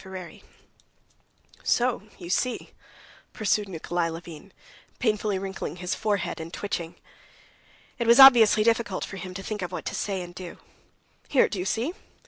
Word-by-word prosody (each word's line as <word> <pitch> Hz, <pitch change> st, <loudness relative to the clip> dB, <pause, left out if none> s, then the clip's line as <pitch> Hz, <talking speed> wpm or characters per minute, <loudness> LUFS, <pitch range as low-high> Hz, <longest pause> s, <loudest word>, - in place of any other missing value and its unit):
Chapter 190 Hz, 0 st, -8 dB
25 180 Hz, -2 st, -11 dB, 1.2 s
"So 250 Hz, 0 st, +1 dB, 0.2 s
you 175 Hz, -1 st, -7 dB
see," 250 Hz, +5 st, -1 dB, 0.6 s
pursued 210 Hz, -1 st, 0 dB
Nikolay 175 Hz, 0 st, -2 dB
Levin, 165 Hz, +2 st, -9 dB, 0.5 s
painfully 210 Hz, -4 st, 0 dB
wrinkling 190 Hz, -3 st, -5 dB
his 180 Hz, 0 st, -3 dB
forehead 210 Hz, -5 st, -1 dB
and 165 Hz, +1 st, -7 dB
twitching. 175 Hz, -4 st, -4 dB, 1.0 s
It 235 Hz, -, -1 dB
was 235 Hz, +3 st, +6 dB
obviously 235 Hz, -5 st, +9 dB
difficult 225 Hz, -4 st, +1 dB
for 195 Hz, -, -8 dB
him 185 Hz, 0 st, -7 dB
to 195 Hz, -, -6 dB
think 210 Hz, 0 st, -4 dB
of 180 Hz, -1 st, -4 dB
what 180 Hz, -, -6 dB
to -, -, -3 dB
say 195 Hz, -3 st, -2 dB
and 175 Hz, 0 st, -10 dB
do. 180 Hz, -1 st, -9 dB, 0.7 s
"Here, 270 Hz, -, +4 dB
do 200 Hz, -, -5 dB
you 180 Hz, -, -2 dB
see?"... 235 Hz, -, -1 dB
195 Hz, 155 wpm, -26 LUFS, 180-220 Hz, 1.2 s, obviously